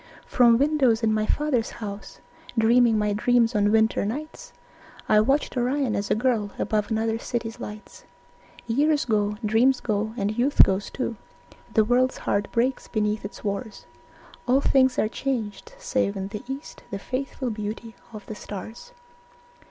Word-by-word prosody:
From 235 -2 +4
windows 265 -5 +2
in 220 -1 +3
my 215 0 0
father's 285 -6 0
house, 205 -2 -8 0.4
Dreaming 230 0 +4
my 210 -1 +1
dreams 235 +2 +2
on 205 0 +2
winter 220 0 +3
nights, 310 - -6 0.6
I 215 - +5
watched 270 +7 +1
Orion 255 0 0
as 200 0 -2
a - - +3
girl 220 -3 0
Above 210 -1 -1
another 225 0 0
city's 230 -1 -4
lights. 210 +1 -9 0.6
Years 290 +6 +2
go, 210 -2 0
dreams 240 +5 +3
go, 215 0 -2
and 205 0 -1
youth 255 +5 +5
goes 195 +1 0
too, 240 -4 -4 0.6
The 220 - +5
world's 255 +3 +2
heart 200 0 -1
breaks 250 +3 0
beneath 210 -1 -1
its 200 - -8
wars, 205 +2 -4 0.6
All 255 +2 +4
things 260 -2 +3
are - - +2
changed, 240 - -4
save 255 - -1
in 195 0 -4
the 210 0 -6
east 270 +3 -7
The 200 - -4
faithful 255 +2 -4
beauty 215 +2 -6 0.2
of 215 -2 -10
the - - -6
stars. 220 - -9
225 Hz, 155 wpm, -25 LUFS, 210-255 Hz, 0.6 s, I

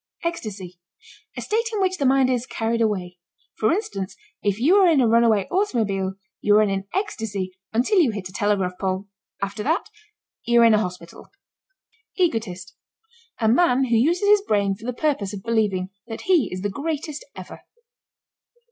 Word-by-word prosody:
ECSTASY. 205 - -5 0.6
A - - -3
state 460 +2 -1
in 430 - -2
which 370 -2 0
the 275 - +2
mind 265 0 +4
is 250 -1 -1
carried 230 +1 -1
away. 185 -5 -1 0.4
For 215 - +3
instance, 205 - -3 0.3
if 205 0 0
you 325 +11 +4
are 385 -2 +6
in 320 -5 +4
a 245 - +4
runaway 225 -3 +3
automobile, 210 - 0 0.2
you 205 0 +4
are 215 - +5
in 195 -1 -2
ecstasy 215 - -3 0.2
until 255 - +2
you 310 -8 +4
hit 205 -4 -4
a - - -13
telegraph 195 -4 0
pole; 190 +1 -2 0.3
after 200 +2 -3
that 320 - -1 0.5
you're 235 -1 +5
in 225 - +6
a 215 - +4
hospital. 180 -4 -7 0.9
EGOTIST. 220 - -1 0.7
A 220 - +3
man 260 +1 +4
who 235 - +3
uses 340 - +2
his 415 0 +6
brain 200 - +1
for 215 +5 -9
the 250 - -1
purpose 220 -10 0
of 190 - -9
believing 205 -5 0 0.2
that 225 -1 -6
he 345 - +2
is 185 - -5
the 205 - 0
greatest 305 - -4
ever. - - -10
225 Hz, 170 wpm, -23 LUFS, 195-300 Hz, 0.9 s, are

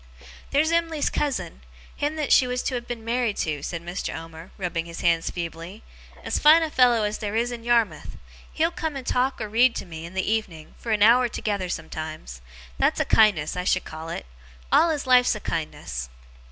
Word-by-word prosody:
'There's 305 +3 +2
Em'ly's 330 -3 0
cousin, 260 - -2 0.3
him 295 +2 -2
that 305 -2 +1
she 255 - +5
was 250 0 -2
to - - -2
have 240 -1 -4
been 235 -2 -6
married 235 -2 0
to,' 150 -3 -2
said 170 +3 -5
Mr. 175 +2 -4
Omer, 165 +2 -10
rubbing 175 -3 -3
his 170 - -7
hands 165 -1 +2
feebly, 170 +4 -7 0.4
'as - - -1
fine 315 +2 +7
a 315 - -3
fellow 245 -4 +4
as 210 0 -2
there 210 0 -3
is 235 +2 +1
in 235 -1 -7
Yarmouth! 235 -2 0 0.3
He'll 325 +2 +1
come 320 -3 -4
and 265 -2 -6
talk 255 +2 0
or 215 - -3
read 235 +3 +3
to - - -4
me, 165 -1 -8
in 180 - -13
the 190 - -1
evening, 200 -8 -3
for 230 - -4
an 210 -1 +3
hour 240 +3 +6
together 200 -5 -3
sometimes. 155 - -6 0.4
That's - - +2
a - - +1
kindness, 205 -9 +3
I 180 - -2
should 185 0 +1
call 160 +1 -8
it! 165 - -5 0.5
All 335 - +5
his 300 -3 -2
life's 250 -2 +5
a - - -5
kindness. 65 - -4
215 Hz, 205 wpm, -25 LUFS, 170-250 Hz, 0.5 s, fine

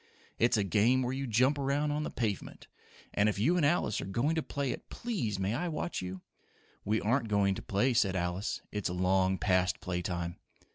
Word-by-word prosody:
"It's 120 0 +4
a 105 - +2
game 110 +7 +3
where 125 +1 -1
you 135 0 -3
jump 130 +6 +3
around 140 +2 +1
on 150 +1 -1
the - - -3
pavement, 110 -5 -3 0.5
and 105 +1 +3
if 105 - -2
you 130 - +3
and 175 - +2
Alice 145 -8 +2
are - - -5
going 120 +11 +1
to 160 - 0
play 140 -3 -2
it, - - -7
please 170 - -2
may 95 +2 -1
I 170 +9 -1
watch 170 +1 -3
you?" 90 0 -6 0.6
"We 110 +2 +1
aren't 115 +2 +1
going 100 -2 +3
to - - -6
play," 125 +7 +1
said 100 -5 +2
Alice. 90 +4 -2
"It's 105 -3 -2
long 95 +1 +2
past 90 +1 +1
play 90 -1 -3
time." 85 0 -3
110 Hz, 205 wpm, -31 LUFS, 95-135 Hz, 0.6 s, It's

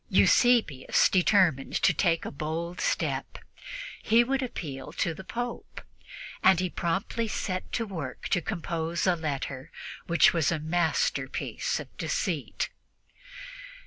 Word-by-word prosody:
Eusebius 230 - +4
determined 180 -7 +3
to - - +4
take 170 -3 +1
a - - -4
bold 165 +4 -4
step - - -1 0.6
he 230 +2 +5
would 270 +2 0
appeal 145 - -5
to 165 - -1
the 190 - -9
Pope, 240 +4 -5 0.6
and 190 -2 +5
he 185 -1 -1
promptly 195 +7 -1
set 185 -3 -3
to 230 - 0
work 160 -11 -6
to 180 - +2
compose 170 -4 -2
a 180 -2 +4
letter 140 -4 -4 0.4
which 170 0 +5
was 165 -3 +2
a 170 - +1
masterpiece 175 - -1
of - - -10
deceit. - - -2
175 Hz, 125 wpm, -28 LUFS, 160-205 Hz, 0.6 s, he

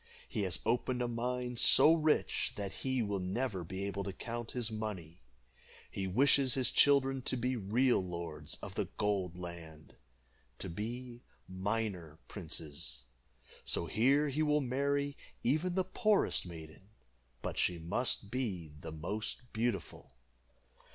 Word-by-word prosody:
He - - -2
has 95 -3 0
opened 125 +2 +1
a - - 0
mine 125 +1 -2
so 155 - +8
rich 155 -2 +2
that 100 -2 -4
he 130 -2 +1
will 100 -2 -1
never 95 +1 -2
be 95 +3 -5
able 100 0 -2
to 100 - -2
count 120 +4 -5
his 120 -3 0
money. 100 -7 -5 0.7
He 95 -1 -2
wishes 130 +5 +4
his 130 -2 +2
children 135 -2 +4
to 130 - -1
be 125 +2 0
real 115 +1 +2
lords 85 -3 -5
of - - -6
the - - -1
Gold 95 -4 0
Land 85 -3 -9 0.6
to 95 - -5
be 120 +6 -5 0.3
miner 95 -4 -2
princes. 75 - -5 0.6
So - - 0
here 135 - +3
he 145 +3 -1
will 150 -1 +3
marry 140 +2 0 0.3
even 155 +8 +1
the 190 - +3
poorest 210 - +2
maiden, 80 +3 -10 0.5
but - - -3
she 90 - +2
must 100 +5 0
be 100 - -2
the 80 +1 -7
most 105 +9 -4
beautiful." 110 -5 -2
110 Hz, 140 wpm, -34 LUFS, 90-130 Hz, 0.7 s, so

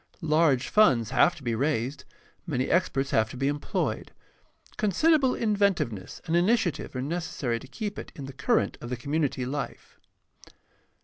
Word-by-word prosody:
Large 155 -4 +3
funds 125 - +4
have 175 - +4
to 145 - -13
be 120 -2 -1
raised, 140 +1 -1 0.4
many 130 -5 -1
experts 140 -6 +1
have 110 0 +2
to 125 - -8
be 135 +2 0
em 145 +1 -1
ployed. - - -2 0.7
Considerable 265 - +3
inventiveness 200 - 0
and 165 -1 0
initiative 180 - +1
are 130 - -2
neces 170 +4 -3
sary 120 -4 -1
to 135 - -12
keep 205 - -5
it - - -9
in 140 - -7
the 135 - -8
current 230 - 0
of 120 - -7
the 125 - -3
community 140 0 -1
life. 140 +2 -6
145 Hz, 165 wpm, -27 LUFS, 130-185 Hz, 0.7 s, funds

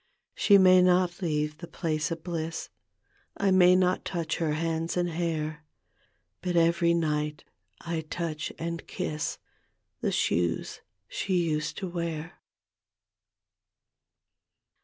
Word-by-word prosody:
She 200 -2 +5
may 185 -1 +7
not 180 0 +3
leave 150 -2 -1
the 170 - -8
place 155 -4 -2
of 165 -1 -5
faliss, 165 -2 -4 0.7
I 200 -2 +2
may 180 -1 +6
not 185 0 +2
touch 170 -3 -2
her 160 -3 0
hands 165 +2 -1
and 175 0 +1
hair, 155 -2 -2 0.8
But 180 -1 -2
every 170 0 +3
night 150 -2 -1 0.4
I 165 -1 -3
touch 160 -3 -3
and 170 0 -5
kiss 150 0 -3 0.6
The - - 0
shoes 85 -1 0 0.3
sbc - - -4
used 155 -3 -1
to 190 - -3
wear. 170 -2 -4
165 Hz, 115 wpm, -28 LUFS, 155-180 Hz, 0.8 s, may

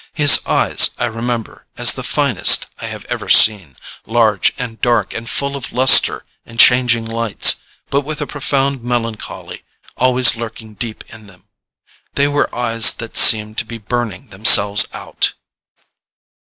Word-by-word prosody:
His 150 -3 +5
eyes - - +3
I 120 - -3
remember 115 0 -7
as - - +4
the - - -8
finest - - +2
I - - -8
have - - -10
ever - - -8
seen, 95 - +4 0.3
large 110 -3 0
and 115 -3 -8
dark 120 -5 -2
and 115 +1 -8
full 140 0 -3
of 140 - -9
lustre 130 +2 +3 0.2
and 115 0 -15
changing 125 -2 +2
lights, 115 -2 +1 0.3
but 140 - -1
with 150 +1 -8
a 150 - -5
profound 140 -2 -4
melancholy 115 -2 -7 0.4
always 125 -1 +2
lurking 115 -1 -10
deep 110 +1 -7
in 110 -2 -14
them. 95 -2 -21 0.7
They 140 0 0
were 145 0 -2
eyes 115 -1 +3
that 115 -1 -11
seemed 110 0 +4
to - - -4
be 115 +1 -10
burning 115 -3 -7
themselves 100 +1 +4
out. - - -4
115 Hz, 150 wpm, -14 LUFS, 110-125 Hz, 0.7 s, His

